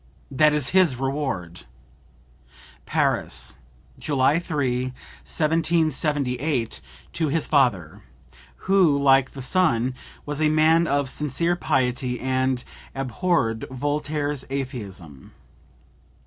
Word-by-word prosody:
That 150 +3 +4
is 150 -3 0
his 185 -7 +3
reward!" 130 - -3 1.2
(Paris, - - -1 0.4
July 145 +2 +2
3, 135 -7 -1
1778, 150 - -1 0.3
to 160 -2 0
his 155 +2 0
father, 115 - +1 0.6
who, 185 -7 +4
like 135 -1 +3
the 135 - -7
son, 130 -6 +1 0.3
was 150 +1 -4
a 155 - +4
man 160 +2 +4
of 140 -1 +1
sincere 150 +5 0
piety 125 -5 -1
and 130 -1 0 0.3
abhorred 130 -3 -1
Voltaire's 145 +1 -2
atheism.) 100 - -6
140 Hz, 90 wpm, -24 LUFS, 125-155 Hz, 1.2 s, That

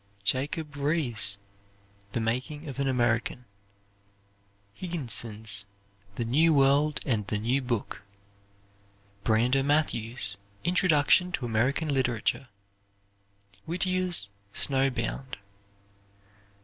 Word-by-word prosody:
Jacob 145 +8 -1
Riis' 135 -9 +1 0.8
"The - - -1
Making 130 +7 -3
of 140 -1 -7
An 140 - 0
American." 120 -1 0 1.3
Higginson's 110 - 0 0.5
"The 120 - -2
New 155 +7 +4
World 140 +2 +3
and 110 -6 -1
the 105 - -1
New 120 +6 0
Book." 120 -4 -3 1.2
Brander 120 +4 +2
Matthews' 125 -7 +1 0.3
"Introduction 180 0 +3
to 125 - -2
American 125 +7 0
Literature." 125 0 -1 1.2
Whittier's 180 - +3 0.2
"Snow 135 -1 +2
Bound." 125 +2 -4
130 Hz, 85 wpm, -27 LUFS, 115-150 Hz, 1.3 s, New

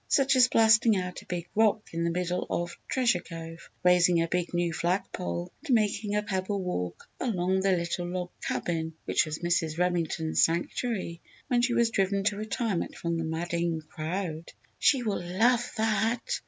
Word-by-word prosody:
Such 275 -1 +3
as 250 -1 +7
blasting 220 -1 +5
out 180 -1 -4
a - - -19
big 175 -1 -4
rock 215 0 +2
in 165 0 -1
the 170 - +1
middle 180 +1 -2
of 175 0 -2
Treasure 240 -8 +2
Cove, 165 -1 -9
raising 180 -1 +5
a 165 - +1
big 175 +1 -1
new 175 -1 0
flag 175 +4 0
pole, 85 0 -4
and 275 -7 +2
making 210 -1 0
a 210 - +1
pebble 195 0 -2
walk 90 - -4
around 190 -5 +1
the 195 0 +2
little 175 +1 -2
log 180 0 -4
cabin 160 -2 -2
which - - +2
was 155 0 -3
Mrs. 165 -2 +1
Remington's 170 -2 +1
sanctuary 170 +1 -1 0.3
when 245 -1 +3
she 245 0 +1
was 235 -1 +3
driven 195 -1 +1
to 205 +1 +1
retirement 215 -2 -2
from 170 0 -2
the - - -1
"madding 170 +1 -1
crowd." 165 0 -4 0.3
"She 265 -3 +4
will 210 -5 -1
love 235 +7 +2
that!" 225 +2 0
180 Hz, 175 wpm, -28 LUFS, 170-215 Hz, 0.3 s, as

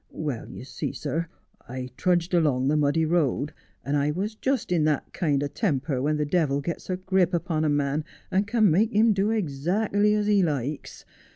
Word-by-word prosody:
Well 145 -7 -5
you - - -9
see, 130 - -5
sir, 165 +3 -3 0.4
I 130 0 -6
trudged 175 +2 +1
along 140 -6 +2
the 150 - +2
muddy 150 +2 +2
road, 155 -3 0 0.3
and 140 - 0
I 145 0 +1
was 195 +8 -2
just 260 -1 -2
in 170 -3 +2
that 150 -2 -1
kind 145 -5 0
o' - - 0
temper 140 - -1
when 150 +2 +1
the 150 - 0
devil 145 -3 +1
gets 170 +6 -5
a 185 - -1
grip 185 -1 +1
upon 165 -2 -1
a 155 - +2
man 145 +1 0 0.3
and 195 +2 +1
can 215 -4 +3
make 215 +8 +3
him 220 +1 +4
do 195 +1 +1
ekzackerly 205 +3 +1
as 210 -1 0
he 205 -1 +3
likes. 145 -4 -3
160 Hz, 195 wpm, -26 LUFS, 145-195 Hz, 0.4 s, him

